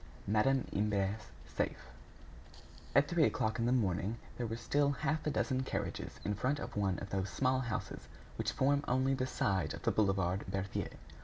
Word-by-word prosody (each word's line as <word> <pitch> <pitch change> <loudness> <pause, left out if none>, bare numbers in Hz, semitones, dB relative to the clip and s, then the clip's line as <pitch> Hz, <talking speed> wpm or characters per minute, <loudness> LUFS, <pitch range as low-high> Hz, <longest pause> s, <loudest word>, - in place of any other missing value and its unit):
Madame 125 +6 +3
Imbert's 100 0 0 0.2
Safe - - -3 1.0
At 140 +1 +6
three 170 0 +3
o'clock 110 +2 0
in 115 - +2
the - - +3
morning, 105 -2 +1 0.2
there 120 - -2
were 110 - -3
still 140 +5 +2
half 150 +2 -1
a - - +4
dozen 130 -2 +1
carriages 130 - -3
in 105 - +1
front 130 +8 0
of - - -6
one 100 -3 +1
of 100 - -7
those 95 0 -1
small 130 +4 +2
houses 115 -4 -4 0.3
which - - -1
form 140 +2 +2
only 130 +2 +2
the 130 -1 0
side 95 -10 0
of - - -11
the - - +3
boulevard 95 -2 +2
Berthier. 95 0 -2
115 Hz, 175 wpm, -34 LUFS, 100-130 Hz, 1.0 s, At